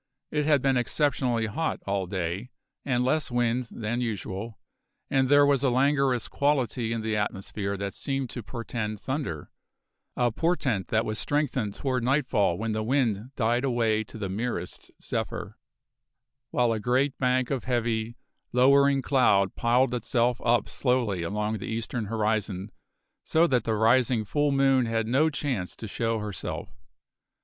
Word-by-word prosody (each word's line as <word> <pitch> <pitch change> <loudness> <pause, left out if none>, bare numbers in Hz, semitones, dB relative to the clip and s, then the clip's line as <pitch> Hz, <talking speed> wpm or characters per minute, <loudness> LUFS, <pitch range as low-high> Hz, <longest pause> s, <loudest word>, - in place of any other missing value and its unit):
It 150 -1 0
had 145 -4 +3
been 135 -2 +3
exceptionally 125 -3 +1
hot 155 +10 -2
all 100 -2 -1
day, 95 +5 -3 0.3
with 125 -3 0
less 150 +4 +1
wind 120 0 0
than 115 +2 -3
usual, 110 -1 -4 0.5
and 135 -2 +2
there 145 0 +6
was 140 -2 +3
a 140 - +3
languorous 135 -1 +2
quality 130 -5 0
in 115 -1 -1
the 110 0 -1
atmosphere 100 0 -3
that 100 0 -4
seemed 135 -3 -3
to 120 - -5
portend 110 -2 -4
thunder, 130 - -4 0.7
a 120 -1 +2
portent 130 - 0
that 110 0 +1
was 110 0 -2
strengthened 135 -8 -1
toward 130 -3 -1
nightfall 125 - +2
when 110 +2 -2
the 110 0 -1
wind 115 -2 0
died 120 +1 +1
away 115 -4 +1
to 110 - -10
the 105 -3 -3
merest 95 -2 -4
zephyr, - - -4 0.9
while 120 -2 +2
a 110 - -2
great 130 +5 +1
bank 125 0 +1
of 135 -3 -2
heavy, 120 -2 -1 0.3
lowering 140 +2 +4
cloud 100 -8 +3
piled 120 +2 +2
itself 120 0 0
up 115 -2 +2
slowly 125 -8 0
along 105 +5 -2
the - - -6
eastern 115 0 -3
horizon 105 -2 -1 0.5
so 160 +1 +3
that 125 -8 +1
the 110 - +1
rising 115 +1 +3
full 145 +6 +1
moon 135 -3 +3
had 115 0 0
no 135 +8 +3
chance 135 - -3
to 110 - -7
show 115 +2 -1
herself. 105 -5 -5
120 Hz, 155 wpm, -27 LUFS, 110-130 Hz, 0.9 s, there